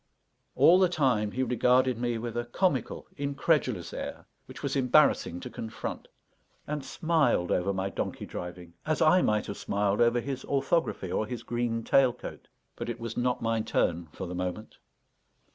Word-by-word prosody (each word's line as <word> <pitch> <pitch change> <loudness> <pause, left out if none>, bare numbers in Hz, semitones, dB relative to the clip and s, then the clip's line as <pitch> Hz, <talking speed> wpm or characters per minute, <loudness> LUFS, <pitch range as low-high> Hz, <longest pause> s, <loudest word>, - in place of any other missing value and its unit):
All 180 +2 +6
the 185 -2 +4
time, 130 -11 +1
he 130 - 0
regarded 125 0 +2
me 120 -1 -1
with 115 0 -5
a 120 0 -1
comical, 135 - -1
incredulous 140 0 0
air, - - -6 0.2
which - - -11
was - - -1
embarrassing 125 - +3
to - - -6
confront; 110 -1 -6 0.6
and 150 -1 -3
smiled 160 - +1
over 90 +2 +1
my 95 0 -2
donkey - - -4
driving, 90 -1 -8
as 155 0 0
I 170 +3 +5
might 105 -6 +1
have 100 - -6
smiled 100 +1 0
over 120 +1 +4
his 135 +1 -4
orthography, 135 - 0
or 110 - 0
his 125 0 -5
green 120 -1 -2
tail 130 +1 +4
coat. 125 - -9 0.3
But - - -5
it 120 - -4
was 115 -1 -5
not 125 -1 0
my 115 -1 +1
turn 85 -5 0
for 95 - -6
the 90 - -6
moment. 90 +4 -5
120 Hz, 170 wpm, -28 LUFS, 105-135 Hz, 0.6 s, All